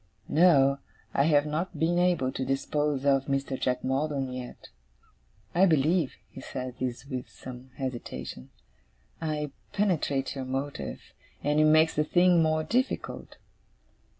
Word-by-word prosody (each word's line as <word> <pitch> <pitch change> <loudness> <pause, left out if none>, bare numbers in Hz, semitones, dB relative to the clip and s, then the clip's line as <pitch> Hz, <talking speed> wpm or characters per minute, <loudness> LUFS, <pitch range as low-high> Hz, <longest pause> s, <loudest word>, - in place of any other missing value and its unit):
No, 140 -4 +5 0.3
I 140 - +3
have 145 -2 +4
not 155 +5 -3
been 170 +2 +2
able 175 -8 +2
to 130 - -3
dispose 140 +1 -1
of 135 -1 +3
Mr. 135 -1 -1
Jack 125 -1 -1
Maldon 135 -1 -1
yet. 125 -1 -8 0.8
I 185 +3 +5
believe,' 160 0 +2 0.2
he - - -9
said 130 -1 -5
this 125 0 -3
with 130 -3 -5
some 125 0 -10
hesitation, 125 - -6 0.7
'I 150 -2 -2 0.2
penetrate 160 -9 0
your 135 -1 -5
motive, 135 +2 -4 0.4
and 150 +1 +2
it 155 - +5
makes 155 +1 +5
the 150 - +2
thing 175 +2 +4
more 155 0 +2
difficult. 250 - -2
145 Hz, 135 wpm, -28 LUFS, 130-160 Hz, 0.8 s, No